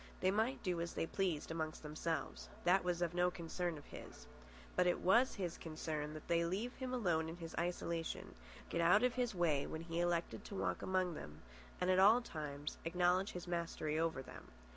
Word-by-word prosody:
They 185 - +3
might 225 +6 +1
do 180 -3 0
as 170 - -4
they - - 0
pleased 170 -4 -1
amongst 160 -1 -3
themselves. 150 - -3
That 185 +2 +4
was 175 -1 0
no 180 0 +3
concern 175 -1 -3
of 145 - -11
his. - - -10 0.5
But 180 - +4
it 175 - +3
was 235 +8 +4
his 180 -5 -3
concern 155 -2 -4
that 155 - -9
they 170 0 +3
leave 200 +9 -1
him 260 -1 -3
alone 175 -10 +1
in 165 - -6
his 165 -2 -7
isolation, 170 -1 -2 0.3
get 170 - 0
out 180 +7 +6
of 250 -1 +3
his 245 -4 0
way 155 -5 +2
when 160 - -4
he 165 0 -3
elected 175 -1 0
to 200 - -7
walk - - -1
among 185 -2 +1
them, 75 - -9 0.4
and 180 +1 +2
at 185 - +4
all 210 +5 +8
times 150 -9 -5
acknowledge 180 +3 +2
his 180 0 -6
mastery 165 -3 -1
over 160 -5 0
them. - - -11
175 Hz, 195 wpm, -38 LUFS, 160-185 Hz, 0.5 s, all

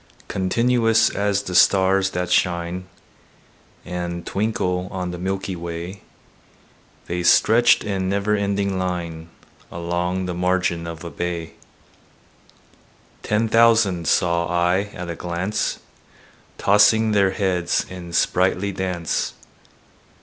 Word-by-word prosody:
Continuous 115 +3 +2
as 100 0 0
the 90 - -6
stars 95 +1 +4
that 90 -1 -3
shine 90 +1 0 1.0
And 85 -1 -5
twinkle 95 -3 -1
on 90 -2 -4
the 90 - -7
milky 95 +1 -3
way, 85 +3 -6 1.0
The 90 0 -3
stretched 115 +7 +5
in 95 -2 -2
never 100 +2 +1
ending 100 -1 -1
line 85 -3 -4 0.4
Along 85 +2 -2
the 90 - -3
margin 90 -1 0
of 85 +1 -7
a 85 - -7
bay: 85 -2 -4 1.7
Ten 110 +2 0
thousand 110 -7 +3
saw 85 +1 +2
I 90 +3 +1
at 90 0 -6
a 85 - -4
glance, 90 +5 -2 0.8
Tossing 105 +2 +4
their 100 -2 +3
heads 95 -3 0
in 90 -2 -9
sprightly 95 +3 +1
dance. 90 -4 -2
90 Hz, 110 wpm, -22 LUFS, 85-100 Hz, 1.7 s, stretched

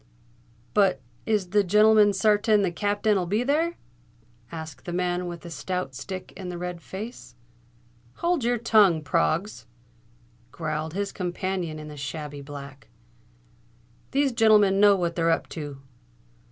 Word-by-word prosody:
"But 195 -8 +3 0.3
is 205 -5 0
the 205 0 +4
gen'leman 210 +2 +5
sartain 210 +1 +3
the 185 - 0
Cap'ain'll 205 +1 0
be 210 +6 +1
there?" 320 +6 +1 0.8
asked 160 -5 -8
the 175 - -4
man 180 0 -1
with 175 -1 -7
the 170 - -10
stout 180 -4 -4
stick 185 +8 -7
and 185 -2 -6
the 175 - -6
red 175 -1 -5
face. 210 - -8 0.8
"Hold 345 -5 0
your 240 +1 +2
tongue, 210 -8 +4
Proggs!" 170 +6 0 0.8
growled 155 +1 -4
his 200 0 -2
companion 180 -2 -3
in 155 0 -8
the 150 -1 -9
shabby 145 0 -6
black. 140 -1 -10 1.2
"These 275 0 +2
gen'lemen 215 -4 +4
know 205 -1 +7
what 170 -3 -1
they're 165 -1 +1
up 165 - +1
to." 145 -4 -7
185 Hz, 140 wpm, -26 LUFS, 165-210 Hz, 1.2 s, know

